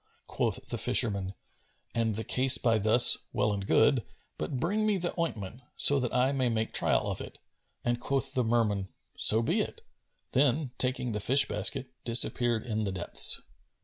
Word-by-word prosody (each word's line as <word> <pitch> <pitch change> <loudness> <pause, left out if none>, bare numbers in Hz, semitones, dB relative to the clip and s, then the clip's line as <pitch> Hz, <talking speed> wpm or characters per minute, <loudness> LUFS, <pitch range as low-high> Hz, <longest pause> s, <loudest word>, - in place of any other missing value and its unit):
Quoth - - -4
the - - -4
fisherman, 100 -3 0 0.6
"An 115 -1 -2
the 110 +2 -5
case 130 +2 +3
by 115 -2 0
thus, 110 +4 +6
well 105 -3 -1
and 100 -1 -6
good; 135 -6 +2 0.4
but 75 +12 -5
bring 200 +10 -2
me 210 -2 0
the 175 -1 -4
ointment, 115 - -5
so 140 -1 +6
that 125 -3 -4
I 125 +2 0
may 130 -3 -1
make 110 -1 -3
trial - - +1
of - - -5
it;" - - -11 0.5
and 120 0 -1
quoth 135 +1 -2
the 125 - -1
Merman, 110 -4 -1 0.3
"So 110 +2 +4
be 170 - -1
it;" 455 - -7 0.5
then, 135 +1 0
taking 125 -1 0
the 105 - -4
fish 135 +6 +5
basket 135 -2 0
disappeared 120 -1 +3
in 110 -2 -3
the 100 - -4
depths. 95 -2 0
120 Hz, 175 wpm, -27 LUFS, 110-135 Hz, 0.6 s, thus